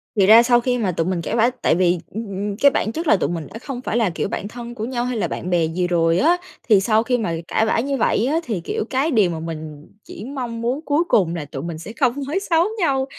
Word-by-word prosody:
Thì 200 -3 +4
ra 225 +4 +8
sau 240 0 +4
khi 250 0 0
mà 210 -6 0
tụi 165 -1 -1
mình 185 -2 -1
cãi 190 - -3
vã, 235 +1 +4
tại - - +3
vì, 180 0 +2
ừm, 220 +1 -5
ừm, 200 +1 -3
cái 280 +4 +5
bản 220 - -1
chất 325 +6 -4
là 215 - +6
tụi - - -1
mình 165 -2 -4
đã 225 - -7
không 250 0 -6
phải 235 - -2
là, 225 -5 +2
kiểu, 165 - -3
bạn 200 - -4
thân 240 +2 -8
của 220 -2 -4
nhau 245 0 -2
hay 250 -1 -2
là 210 - 0
bạn 180 - -5
bè 175 -2 +2
gì 175 +3 -1
rồi 165 -1 +2
á, 340 +4 +4 0.3
thì 210 -3 +7
sau 215 +3 +2
khi 250 +1 +1
mà 215 -8 -2
cãi 220 - +1
vã 220 - +1
như 275 +3 -1
vậy 225 -1 +1
á, 295 +5 +1
thì, 215 - -3
kiểu, - - -2
cái 275 +5 0
điều 210 -8 +3
mà 165 -2 -4
mình 155 -2 -7 0.2
chỉ 210 - -9
mong 245 -4 -5
muốn 245 +4 -1
cuối 295 +3 +2
cùng 175 - +2
là 160 -3 -4
tụi 135 -1 -7
mình 170 -1 -5
sẽ 195 +7 -9
không 255 -5 +3
nói 320 +7 -1
xấu 330 0 +4
nhau, 270 -7 +1
220 Hz, 285 wpm, -21 LUFS, 175-250 Hz, 0.3 s, ra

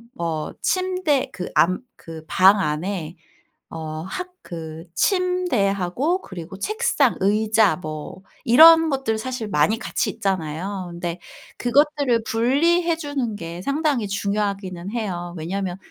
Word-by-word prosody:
뭐 160 -2 -3
침대 370 -7 0
그 180 - -5
안 185 +2 +3 0.2
그 160 -1 -10
방 195 +5 +5
안에 165 0 -2 0.5
어 155 -1 -6
학 360 - -5 0.2
그 160 -2 -7
침대하고 310 - +1
그리고 185 +1 -9
책상, 425 - +1
의자 215 +1 +3
뭐 155 +1 -7 0.2
이런 325 +6 +8
것들 265 -5 -1
사실 245 0 -4
많이 205 +5 +2
같이 230 -2 -1
있잖아요. 185 0 -3
근데 170 0 -5 0.4
그것들을 275 -2 +2
분리해 330 +9 +2
주는 285 -8 -3
게 170 -2 -7
상당히 280 -4 0
중요하기는 200 -2 -2
해요. 180 -7 -4
왜냐면 180 +3 -3
205 Hz, 240 characters per minute, -22 LUFS, 175-275 Hz, 0.5 s, 이런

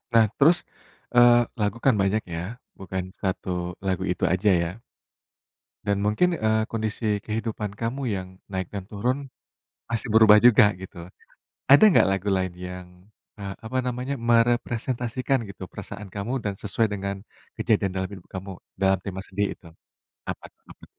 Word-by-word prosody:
Nah 115 -1 +7
terus, 165 +5 +5 0.5
eee, 120 0 +7 0.2
lagu 105 +2 0
kan 135 -4 +4
banyak 100 +3 +1
ya, 85 - -3 0.4
bukan 95 -1 -5
1 90 -2 -3
lagu 95 -1 -1
itu 90 -2 -2
aja 95 +4 +3
ya. 90 +6 -4 1.1
Dan 100 0 +1
mungkin, 110 +13 +2
eee, 110 -4 +1
kondisi 110 -2 -2
kehidupan 110 -1 -3
kamu 120 +4 -3
yang 95 -2 -3 0.2
naik 95 -2 -2
dan 100 -2 -4
turun. 130 +6 -2 0.6
Pasti 115 +1 -3
berubah 110 -1 +7
juga 110 -3 +7
gitu. 90 -2 -10 0.7
Ada 145 - +9
nggak 175 - +5
lagu 95 +1 -1
lain 95 -2 0
yang, 90 0 -7 0.5
eee, 100 -1 -5
apa 110 +4 -5
namanya, 125 +2 -3
merepresentasikan 120 +2 +1
gitu 95 -1 -8
perasaan 100 0 -8
kamu 100 +5 -3
dan 100 - 0
sesuai 105 +3 -1
dengan 100 0 -3 0.4
kejadian 105 -4 +1
dalam 95 +1 -2
hidup 95 -3 -11
kamu, 95 +1 -6 0.2
dalam 95 0 +2
tema 95 -1 -5
sedih 100 +1 -2
itu? 85 - -16 0.6
Apa - - -6
t - - -71
apa? - - -15
105 Hz, 150 wpm, -25 LUFS, 95-115 Hz, 1.1 s, Ada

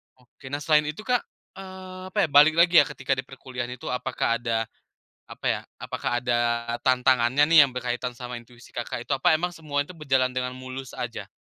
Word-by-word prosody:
Oke 130 +2 -17
nah 145 +2 -4
selain 150 -2 +4
itu 155 +8 -5
Kak, 245 0 +2 0.4
eee, 185 -1 -9
apa - - -8
ya - - +2
balik 150 +2 +7
lagi 170 0 +5
ya, - - +5
ketika 135 +1 -5
di 130 - -4
perkuliahan 125 -2 -6
itu, 125 - -8
apakah 125 -2 -1
ada, 115 -2 0 0.6
apa - - -11
ya, - - -3 0.2
apakah - - -3
ada 120 -1 +1 0.5
tantangannya 130 +1 +3
nih 165 - +7
yang - - -10
berkaitan 125 0 -3
sama 125 0 -6
intuisi 120 0 -17
Kakak 120 0 -4
itu, - - -5
apa 135 - +4
emang 175 +3 -1
semua 145 -3 -2
itu 165 - -11
berjalan 130 -4 +1
dengan 125 0 -3
mulus 130 0 -8
aja? 115 -5 -5
130 Hz, 195 wpm, -25 LUFS, 125-150 Hz, 0.6 s, balik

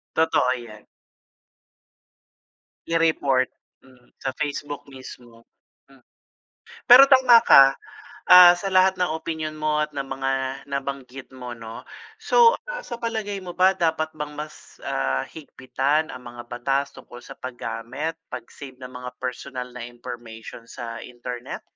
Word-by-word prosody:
Totoo 160 -5 +2
yan. 110 -3 -12 2.0
I-report, 155 -6 +2 0.4
mm, 130 -2 -22
sa 135 - -4
Facebook 145 0 -4
mismo. 125 -3 -13 0.5
Hmm. 135 -1 -20 0.9
Pero 265 +3 +9
tama 255 -3 +7
ka, 135 0 +7 0.5
ah, 180 -1 +10
sa 195 - -4
lahat 185 0 +4
ng 180 -3 0
opinyon 160 -1 -5
mo, 155 0 0
at 150 - -23
ng 140 - -2
mga 135 0 -3 0.4
nabanggit 135 -1 -6
mo, 125 -2 -8
'no? 115 -1 -10 0.3
So, 465 +1 +5
ah, - - -5
sa 235 - -7
palagay 220 -3 -3
mo 180 -2 -8
ba 185 +1 +5
dapat 160 -2 0
bang 150 0 -5
mas, 150 +1 -10
ah, 65 0 -1
higpitan 145 +1 -2
ang 125 - -10
mga 120 - -8
batas 135 +3 -1
tungkol 120 - -13
sa - - -12
paggamit, 130 +5 -5
pag-save 130 +2 -10
ng 125 0 -9
mga 125 0 -8
personal 125 0 -5
na 120 -1 -8
information 120 -2 -10
sa 115 -1 -7
internet? 120 0 -8
135 Hz, 130 wpm, -23 LUFS, 125-160 Hz, 2.0 s, ah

